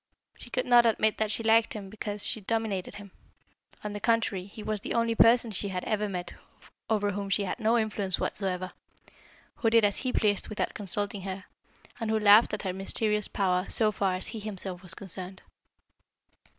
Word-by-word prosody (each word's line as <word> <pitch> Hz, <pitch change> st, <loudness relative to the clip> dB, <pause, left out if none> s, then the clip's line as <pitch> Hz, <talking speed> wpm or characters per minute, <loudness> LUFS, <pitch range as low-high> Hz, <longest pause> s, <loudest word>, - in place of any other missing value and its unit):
She -, -, -11 dB
could -, -, -1 dB
not 240 Hz, -1 st, +6 dB
admit 220 Hz, -1 st, +1 dB
that 220 Hz, -1 st, 0 dB
she 230 Hz, -, +2 dB
liked 225 Hz, 0 st, +3 dB
him 200 Hz, -2 st, -6 dB
because 210 Hz, 0 st, -3 dB
she 220 Hz, -, 0 dB
dominated 210 Hz, -3 st, -2 dB
him; 200 Hz, -2 st, -11 dB, 0.7 s
on 210 Hz, -1 st, -4 dB
the 205 Hz, -, -5 dB
contrary, 220 Hz, -4 st, 0 dB
he 210 Hz, +2 st, -10 dB
was 215 Hz, -1 st, -2 dB
the -, -, -4 dB
only 230 Hz, 0 st, +1 dB
person 230 Hz, 0 st, +4 dB
she 200 Hz, 0 st, -3 dB
had 185 Hz, -2 st, -4 dB
ever 210 Hz, -1 st, -1 dB
met 180 Hz, -2 st, -5 dB, 0.6 s
over 205 Hz, -2 st, +1 dB
whom 200 Hz, 0 st, -4 dB
she 200 Hz, +1 st, +2 dB
had 190 Hz, +5 st, -4 dB
no 225 Hz, +1 st, +2 dB
influence 210 Hz, -4 st, -1 dB
whatever, 185 Hz, -2 st, -2 dB, 0.9 s
who 225 Hz, -, +2 dB
did 225 Hz, -1 st, +5 dB
as 205 Hz, -, 0 dB
he 255 Hz, -, -1 dB
pleased 205 Hz, -4 st, +1 dB
without 215 Hz, -, -3 dB
consulting 205 Hz, 0 st, -1 dB
her, 190 Hz, 0 st, -6 dB, 0.6 s
and 225 Hz, -2 st, -3 dB
who 220 Hz, -, +2 dB
laughed 210 Hz, +2 st, +6 dB
at 210 Hz, -, -4 dB
her 185 Hz, -2 st, -2 dB
mysterious 210 Hz, +2 st, +1 dB
power 185 Hz, -1 st, 0 dB
so 215 Hz, -2 st, +2 dB
far 195 Hz, -2 st, 0 dB
as 185 Hz, -, -4 dB
he 225 Hz, -, -5 dB
himself 195 Hz, -4 st, -6 dB
was 180 Hz, -3 st, -4 dB
concerned. 190 Hz, -1 st, -6 dB
205 Hz, 190 wpm, -28 LUFS, 190-220 Hz, 0.9 s, not